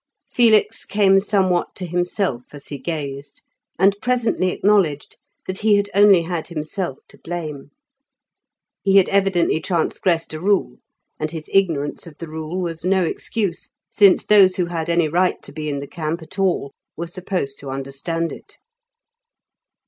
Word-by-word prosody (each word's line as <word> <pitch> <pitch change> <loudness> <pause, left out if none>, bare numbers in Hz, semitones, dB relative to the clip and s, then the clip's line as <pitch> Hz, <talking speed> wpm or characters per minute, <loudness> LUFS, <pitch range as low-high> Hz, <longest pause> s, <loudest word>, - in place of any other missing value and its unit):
Felix 225 -3 +3
came 195 -1 +3
somewhat 190 -3 0
to 185 - -5
himself 175 - -1
as 140 - -10
he 145 - -6
gazed, 145 -4 -6 0.3
and 195 +2 +4
presently 240 -7 +1
acknowledged 180 -7 +1 0.3
that 185 0 -4
he 215 -1 +4
had 200 0 -1
only 200 -3 +6
had 170 -1 -4
himself 160 -1 -4
to - - -17
blame. 155 -5 -6 1.1
He 195 -1 +2
had 190 - +6
evidently 195 -5 +2
transgressed 170 -1 -1
a 155 - -5
rule, 200 +1 +1 0.4
and 155 - -2
his 160 -1 -8
ignorance 165 -5 +1
of 155 -3 -13
the 165 - -7
rule 160 +3 -5
was 165 -3 -4
no 190 +1 +2
excuse, 195 +1 -3 0.2
since 200 -3 +5
those 195 -3 +6
who 180 - 0
had 170 -1 -4
any 170 -1 +2
right 180 +4 +1
to - - -7
be 155 -1 -5
in 140 -1 -3
the 140 - -7
camp 160 +1 -4
at 175 - -10
all 180 -7 0 0.3
were 170 - -3
supposed 175 -5 -4
to 140 - -8
understand 135 +5 -3
it. - - -12
175 Hz, 155 wpm, -21 LUFS, 155-195 Hz, 1.1 s, only